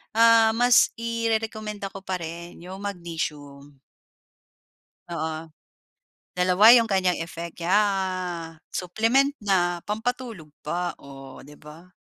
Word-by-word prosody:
ah, 230 0 +6
mas 245 +1 +5
irerekomenda 220 -3 -2
ko 195 -1 -10
pa 185 -2 -3
rin 170 +1 -8
'yong 185 +2 -8
magnesium. 150 -7 -6 1.3
Oo, 160 0 -4 0.9
dalawa 180 +5 +6
'yung 235 -2 +6
kanyang 185 -3 +1
effect, 170 +1 -7
yeah, 185 -3 0 0.2
supplement 230 +10 +1
na, 175 -3 +1
pampatulog 225 -4 -4 0.2
pa. 175 +3 -3
Oh, 135 -1 -12
di 145 +1 -15
ba? 160 +4 -14
185 Hz, 105 wpm, -25 LUFS, 165-220 Hz, 1.3 s, ah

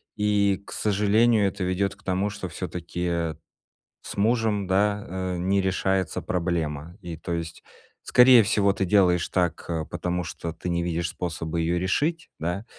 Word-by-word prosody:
и, 100 -2 +2
к - - -11
сожалению, 105 +1 +3
это 95 0 -3
ведёт 95 +2 0
к - - -24
тому, 95 +2 -1
что 100 -3 -6
всё-таки, 90 0 -5
э, 85 -2 -1 0.7
с - - -8
мужем, 110 -1 +1
да, 100 +2 +1
э, 95 0 -3
не 95 +3 +1
решается 95 -2 0
проблема. 85 -2 -2
И, 85 -2 -6
то 85 - -5
есть, 85 -1 -5 0.4
скорее 125 -1 +7
всего, 100 -1 +2
ты 95 - -1
делаешь 90 -3 +3
так, 90 -2 0
э, 80 -2 -2
потому 90 0 -2
что 85 0 -5
ты 85 +2 -5
не 85 0 0
видишь 85 -1 -1
способа 85 -2 -4
ее 85 +1 +1
решить, 150 - -1
да? 90 +6 -2
95 Hz, 165 wpm, -25 LUFS, 85-100 Hz, 0.7 s, скорее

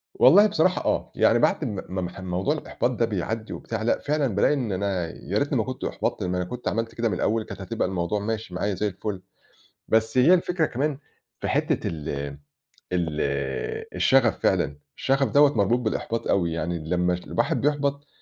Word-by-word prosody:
والله 205 +1 +7
بصراحة 185 -2 +1
آه، - - -1
يعني - - +4
بعد - - +2
ما 100 -2 -3
ما 95 +1 -3
ما 90 +2 -6
موضوع 95 +9 -1
الإحباط 135 -4 -2
ده 115 -2 0
بيعدّي 110 +2 -3
وبتاع، 115 -1 -4
لأ 115 - +2
فعلًا 150 -1 0
بالاقي 150 - +3
إن 125 -7 -2
أنا 95 -3 -1
يا - - -3
ريتني - - +1
ما - - +1
كنت - - -5
أُحبطْت، - - -2
ما 90 0 -1
أنا 90 - 0
كنت 125 +7 -5
عملت 115 +1 -2
كده 115 0 0
من - - -1
الأول 110 0 0
كانت 100 -1 -9
هتبقى 110 +1 -2
الموضوع 95 +2 -1
ماشي 110 -3 -4
معايا 100 +2 -1
زي 105 +4 0
الفل، 95 0 -5 0.7
بس 110 +2 +2
هي 150 +9 +7
الفكرة 175 -2 +2
كمان 140 +2 -1 0.4
في - - -3
حِتّة - - 0
ال 75 -3 -5 0.8
ال 90 -2 +1 0.9
الشغف، 130 -4 +3
فعلًا 75 -6 +1 0.2
الشغف 135 0 +2
دوّة 145 -3 +5
مربوط 105 +4 +3
بالإحباط 115 0 -2
أوي، 85 -4 +2
يعني 85 +1 -2
لمّا 90 0 +2
الواحد 90 - -1
بيُحبَط 140 -1 0
110 Hz, 185 wpm, -25 LUFS, 90-135 Hz, 0.9 s, والله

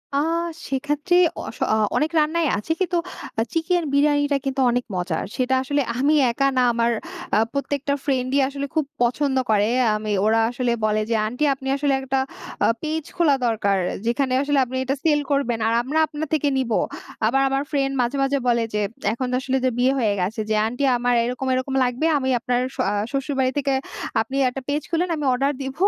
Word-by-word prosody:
আ - - +3 0.5
সেক্ষেত্রে 290 +5 0 0.3
অস - - -8 0.2
অ - - +4 0.2
অনেক 305 +1 +1
রান্নাই 320 +2 +1
আছে 210 +10 -4
কিন্তু 355 -1 +1 0.4
আ - - +3
চিকেন 345 +1 +1
বিরিয়ানিটা 290 0 +3
কিন্তু 270 0 -1
অনেক 245 +1 -1
মজার। 180 -2 -2
সেটা 260 0 +1
আসলে 285 +2 0 0.2
আমি 280 +4 +3 0.2
একা 275 +4 +1
না - - +5
আমার 235 0 +1 0.4
আ - - +4 0.2
প্রত্যেকটা 280 0 -1
ফ্রেন্ডই 265 0 +1
আসলে 280 +1 -4
খুব 310 -2 +2 0.2
পছন্দ 265 +3 +1
করে। 210 -1 +3 0.3
আমি 215 0 -3
ওরা 220 +1 +3
আসলে 245 0 -1
বলে 215 0 +1
যে, 230 - +1
"আন্টি 250 +7 -3
আপনি 265 0 -8
আসলে 280 -1 +1
একটা 270 0 -1 0.5
আ - - +4
পেইজ 310 0 -3
খোলা 320 -5 +4
দরকার। 205 -3 +1 0.3
যেখানে 255 +3 0
আসলে 285 0 +1
আপনি 255 +1 -5
এটা 265 +1 -1
সেল 300 -2 +3 0.5
আর 225 - +1
আমরা 295 +5 0
আপনার 310 +1 -5
থেকে 300 -2 +2
নিবো।" 240 -4 +1 0.5
আবার 265 +5 +3
আমার 270 +1 0
ফ্রেন্ড 275 -2 0
মাঝে, 245 +3 -1
মাঝে 275 +1 +1
বলে 235 -1 +3
যে, 210 - 0 0.3
এখন 255 +2 -3
তো - - +1
আসলে 265 0 0
যে - - +4
বিয়ে 255 +2 +4
হয়ে 220 -4 +2
গেছে 195 +6 -2
যে, 215 - +2
"আন্টি 245 +5 -3
আমার 245 0 +1
এরকম 250 +2 -3
এরকম 260 +1 -2
লাগবে। 250 +4 -1
আমি 260 -2 -1
আপনার 245 +1 0
আ - - -1
শ্ব - - -1 0.3
শ্বশুরবাড়ি 270 -1 0
থেকে 275 -1 +1 0.5
আপনি 240 +4 -5
একটা 270 +2 -6
পেজ 290 +1 0
খুলুন, 345 +2 0
আমি 300 -2 -3
অর্ডার 275 +3 +1
দিব। 265 0 -4
270 Hz, 190 wpm, -22 LUFS, 245-290 Hz, 0.5 s, না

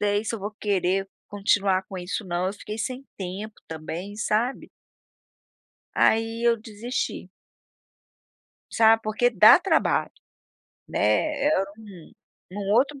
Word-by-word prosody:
sei 205 +1 +1
se 230 - -2
eu - - -4
vou 205 +2 -5
querer 195 -1 0 0.2
continuar 200 -2 +1
com 190 - -7
isso 180 +4 -4
não", 175 0 -1
eu 190 - -1
fiquei 210 +1 -8
sem 255 +4 -4
tempo 195 +3 -6
também, 165 +5 -6
sabe. 220 +4 -1 1.3
Aí 225 +1 +2
eu 235 -1 +4
desisti. 225 +3 -5 1.4
Sabe, 225 0 +5
porque 215 +3 +1
dá 215 - +8
trabalho, 380 +2 +1 0.8
né, 295 -2 +1
é 305 - +3 0.2
um 200 -7 -13 0.4
um 200 -1 -2
outro 275 +6 +2
210 Hz, 125 wpm, -25 LUFS, 195-230 Hz, 1.4 s, dá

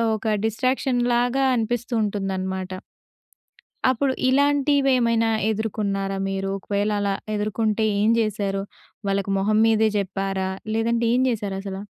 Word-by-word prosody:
ఒక 215 - -8 0.2
డిస్ట్రాక్షన్‌లాగా 245 +2 +1
అనిపిస్తూ 240 +2 -2
ఉంటుందనమాట. 190 -2 -3 1.2
అప్పుడు 260 +2 +1 0.2
ఇలాంటివేమైనా 270 -4 +3 0.2
ఎదుర్కొన్నారా 200 -2 -2
మీరు? 195 0 -2
ఒకవేళ 205 +2 -1
అలా 200 -1 0 0.2
ఎదుర్కొంటే 215 +1 0 0.2
ఏం 215 - +3
జేసారు? 200 -3 -1 0.5
వాళ్ళకి 195 0 0
మొహం 215 +2 +2
మీదే 220 -1 +3
జెప్పారా? 195 -1 -2 0.3
లేదంటే 230 +1 +1
ఏం 255 - +3
జేసారసలా? 195 -2 -4
215 Hz, 100 wpm, -23 LUFS, 195-240 Hz, 1.2 s, ఇలాంటివేమైనా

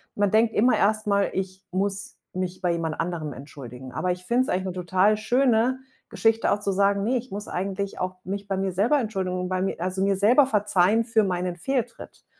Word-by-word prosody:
man 205 -1 +1
denkt 220 +1 +3
immer 245 +4 +3
erst 215 +1 +1
mal: 200 -1 +2
„Ich 190 0 -4
muss 195 +2 -2 0.2
mich 185 0 -4
bei 180 - +1
jemand 165 -2 -2
anderem 165 -4 -3
entschuldigen.“ 130 -2 -10
Aber 180 +8 -1
ich 180 0 -5
finde 240 +6 +2
es - - -6
eigentlich 185 +1 0
'ne 185 - -3
total 185 +4 +2
schöne 245 +2 +2 0.3
Geschichte 225 0 +2
auch 205 - +1
zu 200 -1 -1
sagen: 200 +1 +2
„Ne, 250 +5 +1
ich 250 +1 -7
muss 205 +2 -5
eigentlich 195 +1 -3
auch 185 0 -2
mich 200 +2 -5
bei 195 -1 -1
mir 190 0 -1
selber 225 +11 +3
Entschuldigung 190 -6 -2
bei 185 0 -1
mir 195 - -1
also, 185 +2 -2
mir 195 0 +2
selber 240 +8 +5
verzeihen 210 -1 +2
für 225 -2 +2
meinen 180 -2 -1
Fehltritt.“ 240 +6 -4
195 Hz, 210 wpm, -25 LUFS, 180-220 Hz, 0.3 s, selber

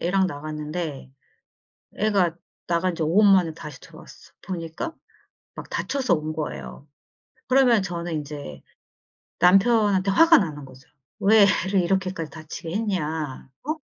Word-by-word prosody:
애랑 190 +2 +1
나갔는데 150 -2 -5 0.9
애가 195 -6 +1 0.3
나간지 170 0 0
5 160 +4 0
분만에 190 -6 +4
다시 150 -4 -10
들어왔어. - - -15
보니까 175 - -5 0.6
막 - - -9
다쳐서 265 -8 0
온 155 -1 -3
거예요. 155 -2 -6 0.6
그러면 255 -5 +4
저는 175 -2 -4
인제 150 -1 -7 0.8
남편한테 195 0 +4
화가 330 - +6
나는 150 - -3
거죠. 130 0 -16 0.3
"왜 210 0 +6 0.2
애를 190 0 +2
이렇게까지 185 -2 -1
다치게 160 +1 -8
했냐? 160 -11 -3 0.2
어?" 310 +3 -2
175 Hz, 270 characters per minute, -24 LUFS, 155-195 Hz, 0.9 s, 화가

